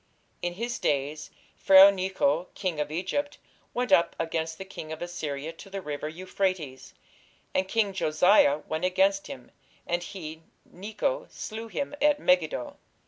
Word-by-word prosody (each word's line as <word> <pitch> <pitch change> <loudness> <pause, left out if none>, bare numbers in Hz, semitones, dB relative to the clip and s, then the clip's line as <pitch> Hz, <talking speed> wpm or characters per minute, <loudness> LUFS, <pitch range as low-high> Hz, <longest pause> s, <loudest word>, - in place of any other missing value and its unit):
"In 175 0 -2
his 235 +4 -3
days 145 +2 -1 0.3
Pharaoh 195 +1 +8
nechoh 185 -4 0
king 180 -6 -2
of 150 - -1
Egypt 190 - -2 0.3
went 245 -3 -2
up 170 -2 +4
against 160 0 -2
the 190 - -7
king 160 -4 -8
of 160 - -5
Assyria 160 -3 -5
to 180 - -13
the 195 0 -5
river 150 -3 -5
Euphrates: 175 -5 -3 0.6
and 185 0 +1
king 205 -1 +1
Josiah 155 -3 +4
went 160 +2 -3
against 195 +2 +2
him; 125 -2 -10 0.3
and 175 0 -1
he 160 -3 -8 0.2
(Necho) 220 - -3
slew 225 +1 -7
him 280 +5 -4
at 295 0 +4
Megiddo." 165 - +1
180 Hz, 145 wpm, -27 LUFS, 155-195 Hz, 0.6 s, Pharaoh